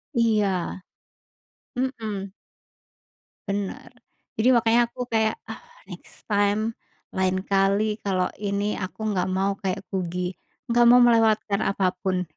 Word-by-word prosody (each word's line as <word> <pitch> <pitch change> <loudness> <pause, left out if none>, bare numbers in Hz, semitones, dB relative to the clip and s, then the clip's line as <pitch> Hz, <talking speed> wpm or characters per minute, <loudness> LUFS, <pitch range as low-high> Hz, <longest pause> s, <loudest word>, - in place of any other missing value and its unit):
Iya, 205 -6 +1 1.0
mmm. 220 -7 -3 1.2
Benar. 200 +2 -4 0.5
Jadi 245 +4 +4
makanya 230 0 +4
aku 250 +1 -6
kayak, 220 -1 +2
"Ah, - - -8 0.3
next - - -13
time, 205 +2 +2 0.4
lain 185 0 0
kali 200 +2 +1
kalau 185 -2 0
ini 205 0 -1
aku 185 +3 -6
nggak 180 0 0
mau 190 +1 +1
kayak 190 -2 -3
Kugy, 180 -1 -2 0.4
nggak 240 0 +5
mau 245 0 +8
melewatkan 220 -3 +3
apa 195 -3 +1
pun." 185 -1 0
200 Hz, 115 wpm, -24 LUFS, 190-220 Hz, 1.2 s, mau